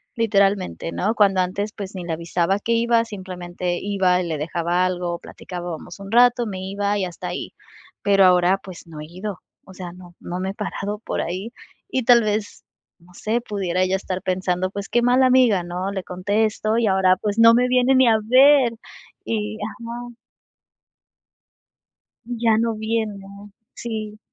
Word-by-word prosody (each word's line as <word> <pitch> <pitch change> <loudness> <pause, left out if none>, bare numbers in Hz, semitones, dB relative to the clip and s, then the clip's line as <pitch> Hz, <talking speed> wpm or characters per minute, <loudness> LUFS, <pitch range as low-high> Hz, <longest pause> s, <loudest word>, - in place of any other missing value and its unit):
Literalmente, 200 -6 +1
¿no?, 210 +4 0
cuando 195 -3 +4
antes, 200 +3 -2
pues 200 -2 -7
ni 185 - -5
le 170 -1 -3
avisaba 170 +3 0
que 225 - -3
iba, 230 0 +3
simplemente 180 -3 -5
iba 190 -3 +1
y 175 - -4
le 160 -2 -2
dejaba 170 +3 0
algo, 175 -1 -2
platicábamos 175 0 -8
un 195 +1 -9
rato, 245 0 +5
me 190 -3 -5
iba 200 +2 -1
y 190 - 0
hasta 175 -2 -7
ahí. - - -5 0.5
Pero 195 -1 +5
ahora 180 +1 +4
pues 180 -3 -11
no 155 -2 -9
he 150 - -7
ido, 185 +3 -6 0.3
o 190 - -13
sea, 180 -2 -8
no 180 -1 -14
no 175 +1 -5
me 190 +1 -2
he - - -4
parado 210 0 -4
por - - -3
ahí 190 +7 -4 0.4
y 260 -7 -1
tal 240 0 +6
vez 210 0 -3 0.4
no 175 +1 -21
sé, 220 +6 -2
pudiera 190 -5 -2
ella 185 +1 +2
estar 190 -1 -4
pensando 185 0 -1
pues 200 0 -6
qué 240 - +2
mala 250 +2 +4
amiga, 250 -8 +4
¿no?, 180 +3 -4
le 190 -2 -4
contesto 210 +4 0
y 235 -2 +2
ahora 190 -1 +3
pues 210 +1 -2
no 230 0 +8
me 250 +1 +3
viene 255 +1 +3
ni 260 -1 +5
a 220 -1 +4
ver 260 +1 +5 0.5
y 215 -1 -2
ajá. 235 +2 -7 2.1
Ya 230 -2 +1
no 230 0 0
viene, 220 -1 -2 0.6
sí. 215 -2 -6
200 Hz, 175 wpm, -22 LUFS, 180-225 Hz, 2.1 s, no